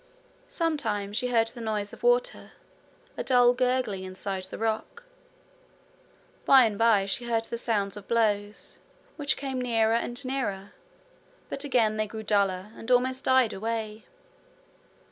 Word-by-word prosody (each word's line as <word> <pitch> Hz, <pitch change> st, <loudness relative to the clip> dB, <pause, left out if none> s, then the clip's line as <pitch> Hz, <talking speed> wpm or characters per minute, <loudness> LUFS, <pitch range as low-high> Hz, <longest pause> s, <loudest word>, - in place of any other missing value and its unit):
Sometimes 225 Hz, -, -1 dB
she 250 Hz, +2 st, 0 dB
heard 230 Hz, -2 st, +2 dB
the 240 Hz, +1 st, -10 dB
noise 210 Hz, -2 st, -3 dB
of -, -, -12 dB
water, 485 Hz, +1 st, +1 dB, 0.6 s
a -, -, -2 dB
dull 245 Hz, -1 st, +5 dB
gurgling 250 Hz, -6 st, 0 dB
inside 185 Hz, 0 st, -5 dB
the 190 Hz, -, -8 dB
rock. 225 Hz, -, -3 dB, 1.4 s
By 265 Hz, -2 st, +7 dB
and 215 Hz, -2 st, -1 dB
by 220 Hz, -2 st, +3 dB
she 220 Hz, +5 st, -3 dB
heard 230 Hz, -1 st, 0 dB
the 235 Hz, -, -5 dB
sounds 205 Hz, -5 st, -1 dB
of 205 Hz, -2 st, -10 dB
blows, 210 Hz, -3 st, -1 dB, 0.4 s
which 290 Hz, -1 st, -1 dB
came 265 Hz, -2 st, -3 dB
nearer 225 Hz, -2 st, +2 dB
and 240 Hz, +3 st, -1 dB
nearer; 205 Hz, -7 st, -3 dB, 0.8 s
but 275 Hz, -, -4 dB
again 230 Hz, -6 st, +2 dB
they 215 Hz, 0 st, 0 dB
grew 220 Hz, +1 st, -7 dB
duller, 200 Hz, -2 st, 0 dB
and 225 Hz, -, -9 dB
almost 255 Hz, +1 st, +2 dB
died 260 Hz, -3 st, +4 dB
away. 220 Hz, +1 st, -4 dB
225 Hz, 145 wpm, -27 LUFS, 205-255 Hz, 1.4 s, By